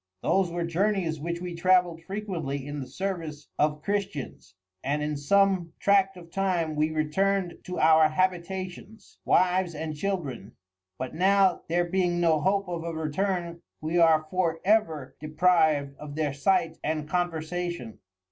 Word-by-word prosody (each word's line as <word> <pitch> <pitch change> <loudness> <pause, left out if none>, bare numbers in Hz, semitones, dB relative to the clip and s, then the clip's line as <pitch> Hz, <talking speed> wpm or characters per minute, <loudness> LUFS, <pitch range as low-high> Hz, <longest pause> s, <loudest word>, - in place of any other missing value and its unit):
Those 190 -2 +2
were 170 0 -2
Journeys, 175 -2 0
which 170 +3 -4
we 180 -1 -5
travelled 175 -1 +2
frequently 165 -8 -4
in 145 0 -5
the 130 - -6
service 165 -6 -5
of 150 0 +1
Christians, 190 - -4 0.3
and 145 +2 -1
in 150 0 -2
some 185 +3 +2
tract 195 -1 +3
of 170 -1 -13
time 175 -5 0
we 155 +1 +1
return'd 175 +4 0
to 180 - -5
our 160 0 +5
Habitations, 185 +4 -3
Wives 180 -1 +2
and 155 0 -4
Children: 150 - -4 0.4
But 130 0 -5
now 190 +1 +3
there 175 +1 +2
being 175 -1 0
no 165 -3 +3
hope 195 +3 +1
of 170 -2 -4
a 170 - -3
return, 170 +2 -2 0.2
we 160 +3 0
are 160 -2 +5
for 170 -3 0
ever 165 -10 +1
depriv'd 155 -3 +2
of 150 -1 -8
their 150 -3 -1
Sight 165 +2 +1
and 155 -1 -2
Conversation. 175 -5 -3
170 Hz, 145 wpm, -27 LUFS, 155-185 Hz, 0.4 s, our